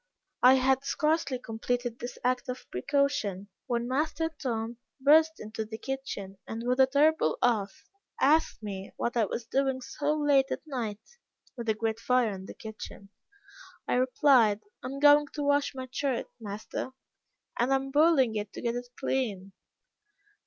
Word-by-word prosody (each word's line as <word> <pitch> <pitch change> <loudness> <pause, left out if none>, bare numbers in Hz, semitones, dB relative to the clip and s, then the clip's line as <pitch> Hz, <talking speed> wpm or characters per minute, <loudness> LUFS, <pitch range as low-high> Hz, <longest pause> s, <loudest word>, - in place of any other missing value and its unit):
I 255 +1 +8
had 265 +1 +2
scarcely 300 -1 0
completed 245 +1 -3
this 245 - -6
act 255 +1 0
of 250 - -5
precaution, 205 - 0 0.2
when 240 -1 -1
master 310 +5 0
Tom 230 -2 -2 0.2
burst 315 +4 +5
into 215 +1 -5
the 220 0 -7
kitchen, 220 -8 -5
and 225 +1 -5
with 250 +1 +1
a 265 - +7
terrible 285 - +3
oath, 210 -5 +1 0.4
asked 300 -5 +3
me 195 -2 -6
what 235 - -2
I 230 -2 +3
was 230 +3 -4
doing 265 +1 0
so 290 +3 -2
late 280 -2 +4
at - - -4
night, 250 - -6 0.4
with 235 -3 -4
a 220 - +2
great 225 0 -2
fire 250 -3 +2
in 190 0 -8
the - - -9
kitchen. 215 -2 -9 0.8
I - - 0
replied, 250 -4 +4 0.2
'I 255 - -5
am 275 +2 -5
going 290 0 +7
to 295 - -3
wash 285 -1 +1
my 260 -1 -5
shirt, 265 -2 -1
master, 210 +3 -5 0.7
and 245 +3 +2
am 270 0 +1
boiling 290 -5 +4
it 210 -1 -3
to - - -7
get 235 -1 0
it 245 0 -5
clean.' 200 -8 -2
250 Hz, 160 wpm, -29 LUFS, 220-275 Hz, 0.8 s, I